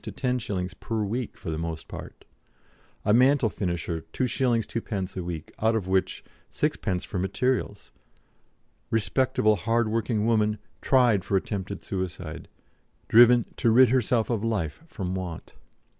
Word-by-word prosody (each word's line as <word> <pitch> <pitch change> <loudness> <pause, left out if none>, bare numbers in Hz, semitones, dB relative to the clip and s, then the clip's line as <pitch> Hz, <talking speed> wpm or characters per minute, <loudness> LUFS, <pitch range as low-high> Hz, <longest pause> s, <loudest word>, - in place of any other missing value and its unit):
to - - -5
10s. 110 -8 -2
per 110 -2 -2
week 115 +4 -3
for 80 - -5
the 80 - -3
most 80 -1 -5
part; - - -10 0.8
a 105 - +4
mantle 125 -1 +4
finisher 85 -3 -3
2s. 125 -3 +1
2d. 100 -5 -4
a - - -1
week, 85 -3 -6
out 110 +1 +3
of 100 -5 -2
which 95 0 0 0.3
6d. 90 -1 -1
for 95 - -4
materials; 105 +2 -1 1.0
"respectable 110 0 +2
hard 115 +5 +1
working 110 -1 0
woman" 110 -2 +2 0.2
tried 120 -8 +4
for 100 - +1
attempted 100 0 -4
suicide, 90 -4 -5 0.6
"driven 120 +1 +7
to 115 - +2
rid 125 +2 +6
herself 120 -2 +2
of 110 -3 -1
life 105 - -2
from 95 - -4
want." 90 -3 -6
105 Hz, 140 wpm, -26 LUFS, 95-120 Hz, 1.0 s, driven